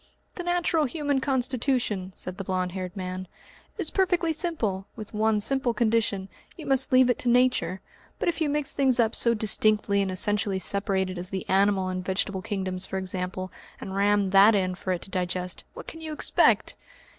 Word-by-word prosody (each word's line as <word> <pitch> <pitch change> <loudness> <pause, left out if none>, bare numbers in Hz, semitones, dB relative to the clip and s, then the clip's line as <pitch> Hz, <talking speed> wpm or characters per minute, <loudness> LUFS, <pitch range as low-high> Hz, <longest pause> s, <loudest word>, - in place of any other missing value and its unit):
"The - - -6
natural 350 -3 +1
human 285 0 -1
constitution," 250 -7 0
said 185 +1 -7
the - - -3
blond 185 -1 -2
haired 185 +1 -6
man, 185 0 -5 0.5
"is 380 -7 0
perfectly 355 -3 +1
simple, 240 - -2
with 215 -1 -9
one 215 0 +2
simple 250 +1 0
condition 215 -4 +1 0.3
you - - -8
must 270 +1 +3
leave 255 -1 +6
it 245 - +1
to 245 - 0
Nature. 245 -6 +2 0.4
But - - -2
if 340 -1 -1
you 305 - +2
mix 295 -1 -1
up - - -13
things 265 -3 +3 0.2
so 235 -1 +4
distinctly 215 -1 +2
and 195 - -1
essentially 200 +1 +1
separated 190 -1 -1
as 180 +1 -5
the 190 -2 -5
animal 195 0 +2
and 185 0 -3
vegetable 190 +1 -1
kingdoms 190 -3 -3
for 190 - -4
example, 185 0 -4 0.3
and 190 - -6
ram 200 -1 +2
that 200 +3 +7
in 185 -2 0
for 185 +1 -4
it 180 - -2
to 195 - -11
digest, 180 -1 -3
what - - -9
can 325 - -9
you 315 -1 -5
expect? - - +2
205 Hz, 185 wpm, -26 LUFS, 185-255 Hz, 0.5 s, that